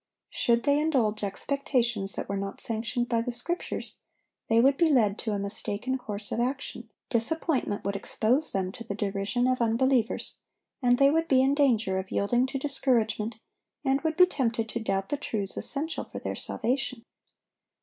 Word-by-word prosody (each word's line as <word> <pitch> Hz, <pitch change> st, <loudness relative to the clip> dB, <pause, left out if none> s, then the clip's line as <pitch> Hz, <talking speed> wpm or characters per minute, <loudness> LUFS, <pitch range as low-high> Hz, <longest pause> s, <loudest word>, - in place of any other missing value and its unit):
Should 235 Hz, 0 st, +2 dB
they 285 Hz, 0 st, +3 dB
indulge 240 Hz, -9 st, +1 dB
expectations 235 Hz, -2 st, 0 dB
that -, -, -4 dB
were 200 Hz, -, -2 dB
not 195 Hz, 0 st, -4 dB
sanctioned 230 Hz, +2 st, -2 dB
by 230 Hz, -2 st, +1 dB
the 245 Hz, +1 st, -2 dB
Scriptures, 330 Hz, +9 st, -3 dB, 0.5 s
they 225 Hz, 0 st, +5 dB
would 270 Hz, +3 st, +5 dB
be 335 Hz, +2 st, +3 dB
led 220 Hz, -8 st, +3 dB
to 220 Hz, -, -2 dB
a -, -, 0 dB
mistaken 205 Hz, +4 st, -3 dB
course 205 Hz, -4 st, -6 dB
of -, -, -1 dB
action; 260 Hz, +3 st, -3 dB, 0.2 s
disappointment 255 Hz, -2 st, 0 dB
would 200 Hz, 0 st, -1 dB
expose 235 Hz, +8 st, 0 dB
them 190 Hz, -1 st, -1 dB
to 230 Hz, +3 st, -8 dB
the 205 Hz, -3 st, -5 dB
derision 200 Hz, +3 st, -1 dB
of 255 Hz, -1 st, +1 dB
unbelievers, 235 Hz, +1 st, +1 dB, 0.4 s
and 245 Hz, -1 st, +4 dB
they 275 Hz, +1 st, +6 dB
would 325 Hz, +2 st, +1 dB
be 260 Hz, -3 st, +5 dB
in 270 Hz, +1 st, +3 dB
danger 225 Hz, -10 st, +2 dB
of 190 Hz, 0 st, -6 dB
yielding 240 Hz, +5 st, +2 dB
to 270 Hz, -, -3 dB
discouragement, 235 Hz, -6 st, 0 dB, 0.5 s
and 270 Hz, +1 st, +2 dB
would 320 Hz, 0 st, -1 dB
be 365 Hz, -, +9 dB
tempted 235 Hz, -9 st, -1 dB
to 235 Hz, -, -3 dB
doubt 195 Hz, -3 st, -1 dB
the 290 Hz, -, 0 dB
truths 205 Hz, -8 st, -3 dB
essential 305 Hz, +3 st, -3 dB
for -, -, -9 dB
their -, -, -4 dB
salvation. 255 Hz, -1 st, -2 dB
240 Hz, 175 wpm, -28 LUFS, 210-270 Hz, 0.5 s, be